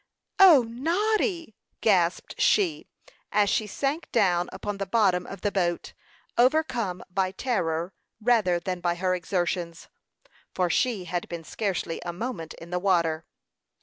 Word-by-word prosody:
"O, 345 -10 +8
Noddy!" 340 - 0 0.3
gasped 180 -5 +1
she, 360 -7 +2 0.4
as 205 -1 +3
she 215 - 0
sank 280 - -3
down 180 -6 +2
upon 200 +1 -5
the 195 - -3
bottom 190 -4 +2
of 195 - -8
the 205 - 0
boat, 175 -3 -1 0.5
overcome 245 - +2
by 190 0 +1
terror, 180 -6 -2 0.3
rather 215 -7 +2
than 180 +1 -4
by 175 -1 0
her 185 +1 0
exertions, 175 -1 -2 0.7
for 180 -2 +1
she 225 0 +1
had 175 0 -3
been 170 -1 -6
scarcely 180 -2 -3
a 175 - -3
moment 180 -5 -5
in 170 +1 -12
the 180 - 0
water. 170 -4 +1
190 Hz, 140 wpm, -26 LUFS, 175-240 Hz, 0.7 s, O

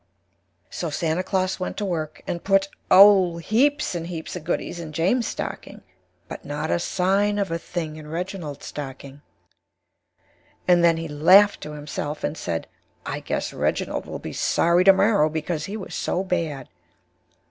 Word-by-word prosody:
So 170 - -3
Santa 160 +3 -1
Claus 185 0 -1
went 185 - -4
to 210 - -2
Work 160 -5 -4
and 170 - -4
Put, 195 0 +2 0.2
Oh! 190 -3 +7
heaps 270 - +1
and 170 -1 -4
Heaps 165 -1 -6
of 180 - -6
Goodies 175 +1 -3
in 160 -2 -7
James' 190 +10 +1
stocking, - - -6 0.5
but - - -8
not 150 +2 -3
a - - +2
Sign 195 +4 +1
of 200 -4 -1
a 165 - -1
Thing 160 -3 -5
in 155 -1 -10
Reginald's 165 -2 -5
stocking. 140 0 -8 1.5
And 175 -1 +5
then 165 -1 +5
he 165 0 -4
Laughed 180 +8 +5
to 150 - -7
himself 150 0 -5
and - - -1
Said 85 - -3 0.4
I - - -3
guess - - -3
Reginald - - -2
will - - -5
be - - -7
Sorry 170 +2 +2
to 195 - +10
morrow 195 -5 +3
because 160 +1 -3
he 205 +2 -5
Was 195 - -8
so 185 - -1
Bad. 165 -8 -2
170 Hz, 165 wpm, -24 LUFS, 155-190 Hz, 1.5 s, to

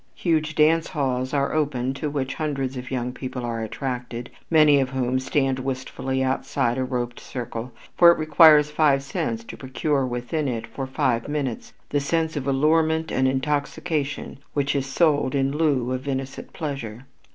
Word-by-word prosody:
Huge 160 -2 0
dance 160 +2 +4
halls 130 -5 -1
are 140 -1 0
opened 135 -4 0
to 150 - -2
which 135 -2 -2
hundreds 135 -4 -2
of 125 0 -6
young 125 -1 -2
people 125 -1 -5
are 115 -1 -3
attracted, 120 +1 -4 0.2
many 155 -3 +6
of 135 -2 0
whom 130 -1 0
stand 135 0 0
wistfully 130 0 -2
outside 130 -1 0
a - - +1
roped 125 -1 -3
circle, 120 -1 -6 0.3
for 170 -1 +9
it - - +1
requires 155 -1 +6
five 145 -3 +3
cents 115 -4 -3
to - - -9
procure 135 +2 -1
within 125 +5 -2
it 115 -3 -2
for 130 +4 -6
five 120 -3 0
minutes 145 -5 -3 0.2
the 145 - +1
sense 160 +3 0
of 140 -2 -3
allurement 160 +3 +2
and 130 0 +2
intoxication 145 +2 -2 0.2
which 145 0 +1
is 135 -1 -1
sold 145 -2 +2
in 135 0 +1
lieu 140 -6 +1
of 130 +2 -3
innocent 135 -1 -4
pleasure. 135 -6 -5
135 Hz, 165 wpm, -24 LUFS, 125-150 Hz, 0.3 s, for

